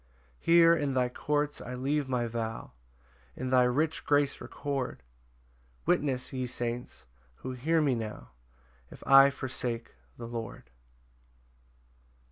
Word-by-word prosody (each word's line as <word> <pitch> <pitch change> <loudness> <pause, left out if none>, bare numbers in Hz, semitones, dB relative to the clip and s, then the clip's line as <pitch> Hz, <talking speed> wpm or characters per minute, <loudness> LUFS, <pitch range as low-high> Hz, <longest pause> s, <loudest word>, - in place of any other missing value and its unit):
6 - - -29
Here 170 0 +7
in 145 -4 -1
thy 125 -1 +2
courts 145 +3 -1
I 125 - -6
leave 140 +2 -1
my 125 -2 0
vow, 115 -1 -4 0.6
And 130 0 -3
thy 125 -1 +6
rich 150 +6 0
grace 145 -1 +2
record; 140 - -4 0.8
Witness, 130 -3 0
ye 130 -1 -2
saints, 120 0 -5 0.3
who 130 - -6
hear 155 +6 +1
me 140 -3 +2
now, 105 - -5 0.6
If - - -13
I 135 0 +8
forsake 125 -4 -4 0.2
the 115 - -7
Lord. 115 - -7
130 Hz, 125 wpm, -30 LUFS, 120-145 Hz, 0.8 s, I